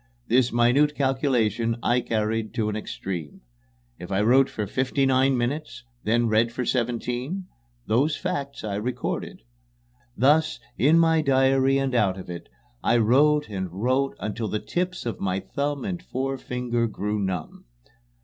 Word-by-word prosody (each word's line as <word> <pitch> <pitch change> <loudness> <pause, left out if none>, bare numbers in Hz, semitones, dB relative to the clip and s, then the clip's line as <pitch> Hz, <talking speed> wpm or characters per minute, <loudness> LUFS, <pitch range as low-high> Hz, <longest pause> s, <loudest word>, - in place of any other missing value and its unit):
This 125 +1 +3
minute 125 +6 +3
calculation 125 -4 +1
I 125 +1 +2
carried 110 -1 -2
to 110 -2 0
an 105 - -3
extreme. 90 -7 -6 0.6
If 90 +2 -8
I 95 +1 +1
wrote 130 +4 +5
for 105 - -3
fifty 130 +6 0
nine 130 0 +3
minutes, 120 0 -3 0.2
and 105 - -2
then - - +1
read 110 +1 +2
for 125 +1 -3
seventeen, 125 +9 -2 0.4
those 135 +8 +1
facts 140 -9 -4
I 100 -2 -2
recorded. 115 - -4 0.7
Thus, 150 +5 +3 0.2
in 150 +5 +4
my 165 -1 +4
diary 135 -1 +3
and 135 -1 -1
out 100 -6 +2
of 90 -2 -8
it, 85 - -8 0.3
I 120 - +3
wrote 145 +7 +4
and 95 -4 -4
wrote 130 +8 0
until 110 +1 -3
the 105 - -1
tips 180 +8 -3
of 115 - -3
my 95 -1 -1
thumb 140 +8 -3
and 175 -3 -3
forefinger 125 -5 -2
grew 105 0 -3
numb. 95 -4 -4
125 Hz, 150 wpm, -25 LUFS, 110-135 Hz, 0.7 s, wrote